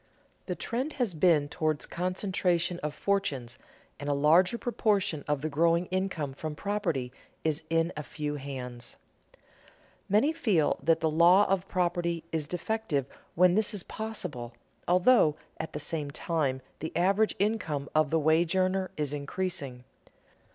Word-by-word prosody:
The -, -, -2 dB
trend 260 Hz, +6 st, -3 dB
has 245 Hz, -8 st, -1 dB
been 155 Hz, -3 st, +3 dB
toward 155 Hz, 0 st, -1 dB
concentration 180 Hz, -1 st, 0 dB
of 150 Hz, 0 st, -4 dB
fortunes 135 Hz, -11 st, -1 dB, 0.4 s
and 145 Hz, +1 st, -4 dB
a 145 Hz, -, +2 dB
larger 165 Hz, +9 st, +4 dB
proportion 205 Hz, -, 0 dB
of 145 Hz, -1 st, -1 dB
the 155 Hz, -, 0 dB
growing 165 Hz, +3 st, +2 dB
income 185 Hz, -7 st, -2 dB
from 155 Hz, +2 st, -5 dB
property 170 Hz, -10 st, -2 dB, 0.3 s
is 155 Hz, 0 st, 0 dB
in 165 Hz, +1 st, +1 dB
a 150 Hz, -, -3 dB
few 150 Hz, 0 st, -4 dB
hands. 125 Hz, -4 st, -7 dB, 1.1 s
Many 220 Hz, +11 st, +3 dB
feel 210 Hz, -, +1 dB
that 165 Hz, +3 st, +2 dB
the 160 Hz, -, +2 dB
law 175 Hz, +5 st, +6 dB
of 195 Hz, -1 st, 0 dB
property 175 Hz, -2 st, 0 dB
is 155 Hz, -3 st, -2 dB
defective 180 Hz, -, -1 dB, 0.3 s
when 180 Hz, +1 st, +5 dB
this 215 Hz, +1 st, +1 dB
is 190 Hz, -, -2 dB
possible, 180 Hz, -, -5 dB, 0.3 s
although 180 Hz, -3 st, +5 dB, 0.2 s
at 160 Hz, -, -5 dB
the 150 Hz, -, -3 dB
same 150 Hz, 0 st, -3 dB
time 140 Hz, -4 st, -1 dB, 0.2 s
the 160 Hz, -, -4 dB
average 195 Hz, +5 st, +2 dB
income 185 Hz, -9 st, -1 dB
of 155 Hz, -1 st, +3 dB
the 165 Hz, -, +2 dB
wage 160 Hz, +3 st, +3 dB
earner 185 Hz, 0 st, +1 dB
is 150 Hz, -2 st, -2 dB
increasing. 140 Hz, -4 st, -4 dB
165 Hz, 145 wpm, -29 LUFS, 150-190 Hz, 1.1 s, law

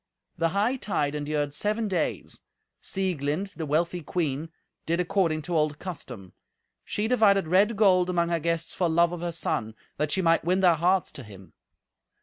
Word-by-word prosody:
The 165 Hz, 0 st, +1 dB
hightide 200 Hz, -, 0 dB
endured 145 Hz, -1 st, -2 dB
seven 215 Hz, +6 st, -1 dB
days. 180 Hz, -5 st, -2 dB, 0.4 s
Sieglind, 185 Hz, 0 st, -2 dB
the 160 Hz, -2 st, -5 dB
wealthy 170 Hz, +4 st, 0 dB
queen, 155 Hz, -2 st, -2 dB, 0.4 s
did 170 Hz, +2 st, +1 dB
according 170 Hz, -3 st, +1 dB
to 175 Hz, +2 st, -3 dB
old 150 Hz, -1 st, +1 dB
custom. 125 Hz, -, -8 dB, 0.5 s
She 210 Hz, +1 st, -2 dB
divided 205 Hz, -7 st, +3 dB
red 200 Hz, +6 st, +3 dB
gold 185 Hz, -4 st, +4 dB
among 170 Hz, -1 st, +1 dB
her 170 Hz, -1 st, +1 dB
guests 165 Hz, +1 st, -2 dB
for 175 Hz, -2 st, 0 dB
love 170 Hz, +1 st, +3 dB
of 175 Hz, -1 st, -5 dB
her 175 Hz, 0 st, -2 dB
son, 110 Hz, -9 st, -2 dB, 0.2 s
that 150 Hz, 0 st, -1 dB
she 190 Hz, -, +1 dB
might 165 Hz, 0 st, +3 dB
win 180 Hz, +3 st, +1 dB
their 180 Hz, -2 st, +6 dB
hearts 180 Hz, +3 st, +1 dB
to 135 Hz, -, -9 dB
him. 100 Hz, -3 st, -14 dB
170 Hz, 165 wpm, -26 LUFS, 150-190 Hz, 0.5 s, their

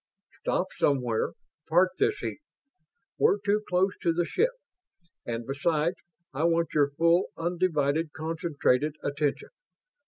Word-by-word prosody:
"Stop 185 Hz, -, -1 dB
somewhere. 125 Hz, -5 st, +1 dB, 0.4 s
Park 180 Hz, +3 st, +4 dB
this 420 Hz, 0 st, +2 dB
heap. -, -, -4 dB, 0.8 s
We're 435 Hz, -2 st, +4 dB
too 205 Hz, +1 st, +1 dB
close 185 Hz, +2 st, +2 dB
to 170 Hz, -, +2 dB
the 170 Hz, +1 st, 0 dB
ship; 465 Hz, -, +2 dB, 0.8 s
and 115 Hz, 0 st, -3 dB
besides, 155 Hz, +5 st, 0 dB, 0.4 s
I 150 Hz, +5 st, 0 dB
want 170 Hz, 0 st, +1 dB
your 145 Hz, -2 st, +3 dB
full, 170 Hz, +5 st, +3 dB
undivided, 165 Hz, -3 st, 0 dB
concentrated 155 Hz, -3 st, 0 dB
attention. 145 Hz, 0 st, -1 dB
165 Hz, 120 wpm, -28 LUFS, 145-180 Hz, 0.8 s, Park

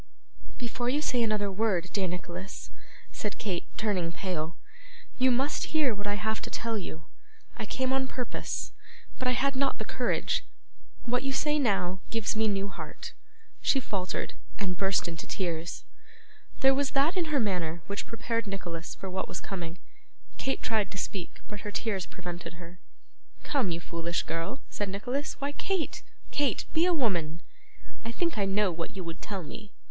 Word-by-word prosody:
'Before 240 Hz, 0 st, 0 dB
you 285 Hz, +4 st, +3 dB
say 255 Hz, -5 st, +3 dB
another 210 Hz, -3 st, +3 dB
word, 190 Hz, -3 st, +2 dB
dear 195 Hz, -2 st, +3 dB
Nicholas,' 180 Hz, +1 st, -5 dB, 0.4 s
said 210 Hz, -2 st, -2 dB
Kate, 185 Hz, -5 st, -1 dB
turning 190 Hz, -6 st, +2 dB
pale, 170 Hz, -3 st, -2 dB, 0.6 s
'you 260 Hz, +1 st, +7 dB
must 270 Hz, +5 st, +2 dB
hear 280 Hz, -6 st, +5 dB
what 205 Hz, 0 st, -3 dB
I 205 Hz, -, +2 dB
have 220 Hz, +1 st, 0 dB
to -, -, -4 dB
tell 230 Hz, 0 st, 0 dB
you. 160 Hz, -6 st, -4 dB, 0.5 s
I -, -, -3 dB
came 260 Hz, 0 st, +1 dB
on 265 Hz, 0 st, +3 dB
purpose, 250 Hz, -2 st, -2 dB, 0.5 s
but 255 Hz, -, +1 dB
I 250 Hz, -, +5 dB
had 275 Hz, +2 st, +3 dB
not 275 Hz, +1 st, +2 dB
the -, -, -3 dB
courage. -, -, +1 dB, 0.6 s
What 245 Hz, +1 st, +3 dB
you 275 Hz, 0 st, 0 dB
say 300 Hz, +2 st, +3 dB
now, 195 Hz, -7 st, +3 dB
gives 225 Hz, -2 st, +1 dB
me 220 Hz, 0 st, +4 dB
new 200 Hz, -1 st, +2 dB
heart.' 195 Hz, -, -6 dB, 0.5 s
She 270 Hz, -, +5 dB
faltered, 195 Hz, -7 st, -1 dB, 0.2 s
and 190 Hz, -3 st, 0 dB
burst 195 Hz, -1 st, +3 dB
into 165 Hz, -1 st, -4 dB
tears. 170 Hz, -3 st, -1 dB, 0.8 s
There 270 Hz, 0 st, +8 dB
was 275 Hz, 0 st, +2 dB
that 290 Hz, +6 st, +5 dB
in 360 Hz, -3 st, +3 dB
her 300 Hz, -3 st, +3 dB
manner 175 Hz, -7 st, +1 dB
which 200 Hz, 0 st, -3 dB
prepared 230 Hz, 0 st, -1 dB
Nicholas 175 Hz, -4 st, -3 dB
for 195 Hz, -, -5 dB
what 190 Hz, 0 st, -1 dB
was -, -, -3 dB
coming. 175 Hz, -3 st, -4 dB, 0.6 s
Kate 270 Hz, -, 0 dB
tried 215 Hz, -3 st, +2 dB
to 195 Hz, -, -6 dB
speak, 190 Hz, -2 st, -3 dB
but 210 Hz, -, -5 dB
her 210 Hz, -, -3 dB
tears 200 Hz, -5 st, 0 dB
prevented 175 Hz, -1 st, -5 dB
her. 175 Hz, 0 st, -10 dB, 0.6 s
'Come, 270 Hz, -10 st, +2 dB
you 170 Hz, -1 st, 0 dB
foolish 170 Hz, 0 st, -1 dB
girl,' 165 Hz, +11 st, -2 dB
said 205 Hz, -1 st, -2 dB
Nicholas; 245 Hz, +9 st, -1 dB
'why, 280 Hz, 0 st, 0 dB
Kate, 370 Hz, +3 st, 0 dB, 0.3 s
Kate, 290 Hz, -2 st, +2 dB
be 325 Hz, +2 st, +5 dB
a -, -, +5 dB
woman! 175 Hz, -, +2 dB, 0.6 s
I 230 Hz, -, -2 dB
think 335 Hz, -1 st, +1 dB
I 200 Hz, -, +4 dB
know 195 Hz, 0 st, +4 dB
what 165 Hz, +2 st, -3 dB
you 185 Hz, -, -2 dB
would 165 Hz, -1 st, -5 dB
tell 195 Hz, -3 st, -3 dB
me. 210 Hz, +6 st, -8 dB
205 Hz, 175 wpm, -31 LUFS, 180-255 Hz, 0.8 s, There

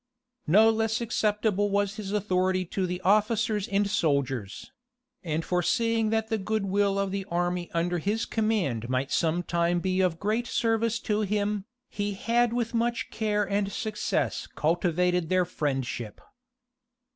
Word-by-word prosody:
No 215 Hz, +8 st, +6 dB
less 225 Hz, 0 st, 0 dB
acceptable 210 Hz, -3 st, 0 dB
was 200 Hz, 0 st, 0 dB
his 200 Hz, -2 st, -5 dB
authority 185 Hz, -2 st, +1 dB
to 185 Hz, +2 st, -2 dB
the 180 Hz, 0 st, -3 dB
officers 210 Hz, +1 st, +2 dB
and 200 Hz, +1 st, +1 dB
soldiers; 140 Hz, -, -1 dB, 0.5 s
and 160 Hz, -1 st, -2 dB
foreseeing 225 Hz, +5 st, +1 dB
that 220 Hz, 0 st, 0 dB
the 220 Hz, -, 0 dB
good 215 Hz, +1 st, -1 dB
will 200 Hz, 0 st, +1 dB
of 200 Hz, -1 st, 0 dB
the 195 Hz, 0 st, -2 dB
army 175 Hz, -1 st, -1 dB
under 175 Hz, +1 st, 0 dB
his 210 Hz, +6 st, -1 dB
command 185 Hz, -, -1 dB
might 130 Hz, +2 st, -1 dB
some 170 Hz, +2 st, +1 dB
time 170 Hz, 0 st, +1 dB
be 185 Hz, +1 st, 0 dB
of 175 Hz, -3 st, +1 dB
great 220 Hz, +5 st, 0 dB
service 225 Hz, 0 st, +1 dB
to 210 Hz, 0 st, 0 dB
him, 205 Hz, -1 st, -1 dB, 0.2 s
he 205 Hz, -1 st, -3 dB
had 235 Hz, +3 st, +1 dB
with 235 Hz, -1 st, -2 dB
much 235 Hz, 0 st, -1 dB
care 210 Hz, -2 st, 0 dB
and 200 Hz, 0 st, 0 dB
success 215 Hz, +1 st, -2 dB
cultivated 175 Hz, +1 st, +1 dB
their 185 Hz, -1 st, +3 dB
friendship. 135 Hz, -9 st, -3 dB
200 Hz, 145 wpm, -27 LUFS, 175-215 Hz, 0.5 s, No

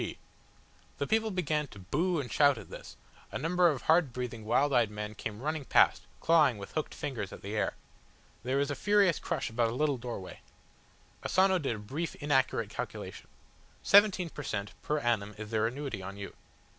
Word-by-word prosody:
G." -, -, -4 dB, 0.8 s
The -, -, -1 dB
people 220 Hz, 0 st, +1 dB
began 155 Hz, -6 st, -1 dB
to 105 Hz, -, -14 dB
boo 155 Hz, -, 0 dB
and 125 Hz, -4 st, -5 dB
shout 145 Hz, -2 st, +4 dB
at -, -, -10 dB
this, -, -, -10 dB, 0.3 s
a -, -, -3 dB
number 175 Hz, +2 st, +3 dB
of 140 Hz, -5 st, -3 dB
hard 160 Hz, -4 st, +4 dB
breathing, 120 Hz, -3 st, -5 dB
wild 140 Hz, +6 st, +2 dB
eyed 120 Hz, -4 st, +4 dB
men 105 Hz, 0 st, -5 dB
came 105 Hz, 0 st, -6 dB
running 155 Hz, 0 st, -2 dB
past, -, -, +4 dB, 0.2 s
clawing 155 Hz, -8 st, +4 dB
with 100 Hz, -1 st, -8 dB
hooked 155 Hz, -, -3 dB
fingers 125 Hz, -, -4 dB
at -, -, -10 dB
the 100 Hz, +2 st, -4 dB
air. 105 Hz, -, 0 dB, 0.7 s
There 130 Hz, +3 st, -1 dB
was 140 Hz, 0 st, +1 dB
a -, -, -2 dB
furious 205 Hz, -3 st, +3 dB
crush -, -, -3 dB
about 115 Hz, 0 st, +1 dB
a 115 Hz, -, -4 dB
little 145 Hz, 0 st, +1 dB
doorway. 115 Hz, -6 st, -7 dB, 0.8 s
Asano 190 Hz, 0 st, +3 dB
did 135 Hz, -7 st, -1 dB
a -, -, -7 dB
brief, 140 Hz, +11 st, -4 dB
inaccurate 140 Hz, -3 st, +1 dB
calculation. -, -, -6 dB, 0.6 s
"Seventeen 195 Hz, -4 st, +5 dB
per -, -, -7 dB
cent, 105 Hz, -6 st, -3 dB
per 150 Hz, -, -1 dB
annum 110 Hz, -6 st, 0 dB
is 110 Hz, 0 st, -7 dB
their 110 Hz, 0 st, +2 dB
annuity 130 Hz, -4 st, -4 dB
on 95 Hz, +1 st, -7 dB
you. 100 Hz, -1 st, -7 dB
135 Hz, 190 wpm, -31 LUFS, 110-160 Hz, 0.8 s, Seventeen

